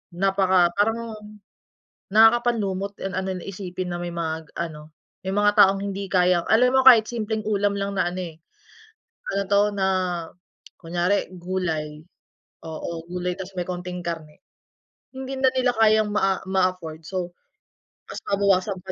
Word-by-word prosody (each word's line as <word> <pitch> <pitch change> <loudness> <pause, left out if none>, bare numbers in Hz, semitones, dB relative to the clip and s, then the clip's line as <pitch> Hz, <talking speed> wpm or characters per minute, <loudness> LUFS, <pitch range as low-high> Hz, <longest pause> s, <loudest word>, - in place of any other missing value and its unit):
Napaka 190 -2 +3
parang, 225 +2 0 1.0
nakakapanlumo't 215 -3 +3
ang 195 0 -3
ano 190 0 -3
na - - -10
isipin 185 -2 -5
na 175 - -3
may 175 0 -4
mga 160 -2 -4
ano, 155 -2 -6 0.3
may 190 0 -3
mga 205 0 +4
taong 195 -1 +6
hindi 200 0 -4
kayang 180 -2 +2
alam 250 +3 +4
mo 265 - +4
kahit 230 -4 +9
simpleng 220 -2 -3
ulam 205 -1 +1
lang 200 0 -3
na - - +2
ano, 180 +1 -4
eh, 165 -3 -8 1.0
ano 200 - +1
'to, 200 0 +5
na, 195 -1 0 0.9
kunyari 175 +4 0
gulay. 165 -4 -3 0.7
Oo, 165 +1 -6
gulay 180 0 -2
tapos 190 0 -8
may 175 0 -2
konting 180 0 -5
karne, 160 -3 -6 0.8
hindi 265 0 -5
na 265 - +5
nila 255 -1 +2
kayang 215 -1 +4
maa 195 -2 +1
ma-afford 185 -4 -1
so 180 0 -4 0.8
ta's - - -7
babawasan 200 -1 +1
pa 185 - -3
190 Hz, 145 wpm, -24 LUFS, 175-205 Hz, 1.0 s, kahit